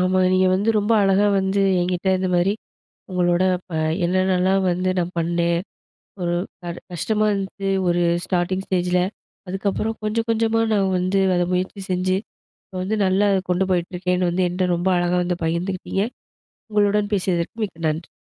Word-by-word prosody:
ஆமா. 185 +1 +2
நீங்க 185 0 +4
வந்து 205 +4 +2
ரொம்ப 210 +2 +1
அழகா 195 +1 +3
வந்து 190 +1 0 0.2
எங்கிட்ட 180 +1 -1
இந்தமாரி 185 +1 +1 0.6
உங்களோட 175 0 +2 0.3
ப - - -16 0.3
என்னென்னலாம் 185 +1 +2
வந்து 185 +1 0
நான் 175 0 -1
பண்ணேன், 170 0 +1 0.6
ஒரு 175 0 0 0.3
க 175 -1 -4 0.2
கஷ்டமா 215 +5 0
இருந்து, 195 0 -4 0.2
ஒரு 175 0 +2 0.2
ஸ்டார்ட்டிங் 185 +1 -1
ஸ்டேஜில. 180 -1 +1 0.5
அதுக்கப்பறம் 200 +4 -2
கொஞ்ச 215 +2 -1
கொஞ்சமா 225 0 +2
நான் 195 -2 +2
வந்து 185 +2 +1 0.2
அத 175 - +2
முயற்சி 185 +2 -2
செஞ்சு, 185 +1 +1 0.5
இப்ப 190 - -21
வந்து 215 +4 -1
நல்லா 190 +2 +3
அதை 190 - +2
கொண்டு 185 +1 +2
போயிட்டுருக்கேன்னு 180 +1 0
வந்து, 180 +1 +1
என்ட்ட 180 +1 -1
ரொம்ப 175 +2 0
அழகா 175 0 +1
வந்து 175 -1 -2
பகிர்ந்துகிட்டீங்க. 185 +4 -1 0.7
உங்களுடன் 205 0 +2
பேசியதற்கு 180 +3 -1
மிக்க 165 -4 -4
நன்றி. 155 +2 -4
185 Hz, 150 wpm, -22 LUFS, 175-195 Hz, 0.7 s, நீங்க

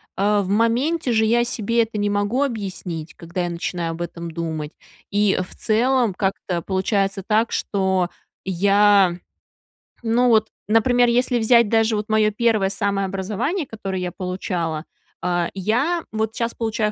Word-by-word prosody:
э, 205 +1 +2
в 190 - -4
моменте 245 +8 +1
же 220 -1 +3
я 235 +2 +3
себе 230 -1 0
это 225 -1 -6
не 205 0 0
могу 205 +6 +1
объяснить, 190 - -5
когда 170 +2 -4
я 175 - -2
начинаю 170 0 -3
об 165 +1 -7
этом 170 0 -5
думать. 160 -2 -4 0.4
И 205 -1 +2
в 185 - -9
целом 240 0 +2
как-то 190 -2 -2
получается 195 +1 -1
так, 220 +2 +2
что 190 -3 0 0.4
я, 195 0 +4 0.9
ну, 235 +2 +2
вот, 220 -2 +4 0.2
например, 245 +3 +4
если 245 +1 +2
взять 235 0 +5
даже 225 +1 +2
вот 210 0 -3
мое 215 -1 +3
1 215 -3 +2
самое 195 0 -1
образование, 195 - -2
которое 195 -6 -5
я 180 -1 -3
получала, 175 -3 -3 0.4
а, 175 -1 0
я 245 - 0
вот 220 0 -2
щас 235 -1 -2
получаю 220 -2 -1
205 Hz, 155 wpm, -22 LUFS, 185-230 Hz, 0.9 s, взять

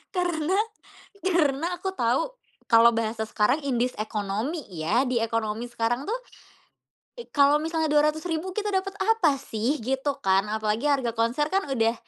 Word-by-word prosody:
Karena 355 0 0 0.7
karena 325 -4 +2
aku 380 0 -4
tahu 255 - 0 0.3
kalau 235 -1 +7
bahasa 225 -1 -2
sekarang 245 +8 +1
"in 245 -3 0
this 250 +1 0
economy" 215 - -2
ya, 185 +8 0
di 245 -2 +1
ekonomi 225 0 -2
sekarang 240 +4 -1
tuh, 475 +4 -1 1.0
i 475 - -8
kalau 285 0 +4
misalnya 320 -1 -1
Rp200.000 315 +4 +1
kita 420 0 -1
dapat 385 +1 -1
apa 445 -10 +3
sih? 240 +5 -2
Gitu 265 +4 -1
kan. 190 +1 +3
Apalagi 220 +4 -1
harga 265 -4 +1
konser 235 +6 +1
kan 390 -3 0
udah, 230 -2 +2
270 Hz, 150 wpm, -26 LUFS, 230-325 Hz, 1.0 s, kalau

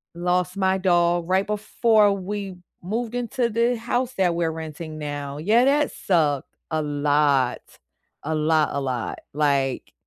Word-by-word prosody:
lost 180 +2 0
my 190 0 +2
dog 175 -2 +2
right 190 +1 +2
before 210 0 +2
we 195 0 -5 0.3
moved 225 +6 -3
into 245 0 -1
the 235 +2 +1
house 245 +2 -2
that 180 -3 +2
we're 165 -1 0
renting 160 0 -7
now. 145 -1 -5
Yeah, 220 - +3
that 290 +1 +2
sucked, 150 -7 0 0.2
a 155 0 0
lot. 145 -3 +1 0.6
A 160 +1 -2
lot, 155 0 +2
a 140 - -1
lot, 125 -4 -3
like 140 -3 0
175 Hz, 145 wpm, -23 LUFS, 150-210 Hz, 0.6 s, Yeah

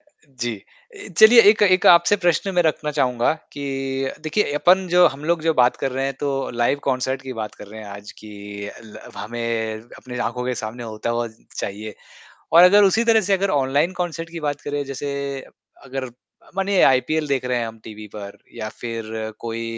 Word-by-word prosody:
अ, 300 - -41 0.4
जी। 120 -1 -1 0.4
ए 405 - -10
चलिए 230 +2 +9
एक 210 0 +1
एक - - -2
आपसे 170 +4 +4
प्रश्न 175 +3 +2
मैं 175 - +4
रखना 150 -1 -1
चाहूँगा 125 -1 +2 0.2
कि 145 - -7 0.6
देखिए 210 -2 0
अपन 185 +1 +4
जो 180 -1 +7
हम 145 +2 -10
लोग 165 -2 +1
जो 160 - +3
बात 125 0 +4
कर 135 -2 -1
रहे 135 - 0
हैं 135 - -2
तो 140 - 0 0.3
लाइव 140 +4 +2
कॉन्सर्ट 130 +1 -1
की - - -3
बात 105 - -5
कर 105 - -9
रहे 110 - -8
हैं 105 - -10
आज 100 +1 -9
कि 105 - -11 0.5
ल 110 - -12 0.2
हमें 115 -1 -3 0.2
अपने 125 -1 -8
आँखों 125 +1 -5
के 125 - -1
सामने 115 +3 -6
होता 110 +2 -3
हुआ 120 0 -1 0.3
चाहिए। 105 +1 -5 0.6
और 170 +2 +8
अगर 205 +3 +7
उसी 220 +4 +3
तरह 225 -1 +4
से - - +2
अगर 195 +1 0
ऑनलाइन 145 +5 +1
कॉन्सर्ट 170 -2 -4
की 165 -1 -7
बात 145 -1 -2
करें। 145 0 -3
जैसे 140 +1 -4 0.7
अगर 135 0 -5
अ, 125 - -8 0.5
मानिए 195 0 +2
आईपीएल 150 +4 +1
देख 135 -2 0
रहे 125 -1 0
हैं 115 - -2
हम 115 0 -9
टीवी 110 -1 -9
पर 100 -1 -9 0.2
या 110 - -5
फ़िर 115 -2 -5 0.3
कोई 115 0 -4
135 Hz, 200 wpm, -21 LUFS, 115-170 Hz, 0.7 s, चलिए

